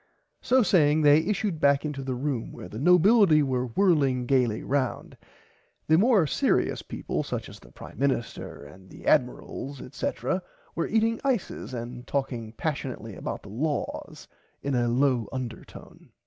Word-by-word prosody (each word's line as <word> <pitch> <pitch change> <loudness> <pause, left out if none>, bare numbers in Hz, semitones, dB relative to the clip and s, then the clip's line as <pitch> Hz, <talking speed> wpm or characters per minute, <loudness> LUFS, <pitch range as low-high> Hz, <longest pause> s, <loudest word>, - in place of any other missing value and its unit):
So 255 0 +3
saying 155 -5 +3
they 145 +1 +7
issued 195 0 -1
back 140 0 +4
to 150 - -2
the 135 -2 -4
big 125 - -6
room 130 -6 -2
where - - -9
the 110 - -8
nobility 180 - +5
were 130 -2 -1
whirling 135 - +2
gaily 120 -4 +1
roand 135 -2 -2 0.7
the 160 - +4
more 215 -5 +4
searious 140 - +1
peaple - - -4
such - - -4
as - - -12
the - - -18
prime - - -12
minister 130 - -2
and 95 +6 -15
the - - -13
admirals 135 0 0
etc 130 +7 -3 0.3
were 165 - -1
eating 225 +1 +1
ices 240 - -2
and 120 +1 -7
talking 120 -5 -3
passionately 130 -6 -4
about - - -5
the 100 - -11
laws 145 +8 -4 0.4
in 140 - -1
a 120 -1 +2
low 125 -2 +1
undertone. 125 -3 -8
140 Hz, 155 wpm, -26 LUFS, 125-160 Hz, 0.7 s, they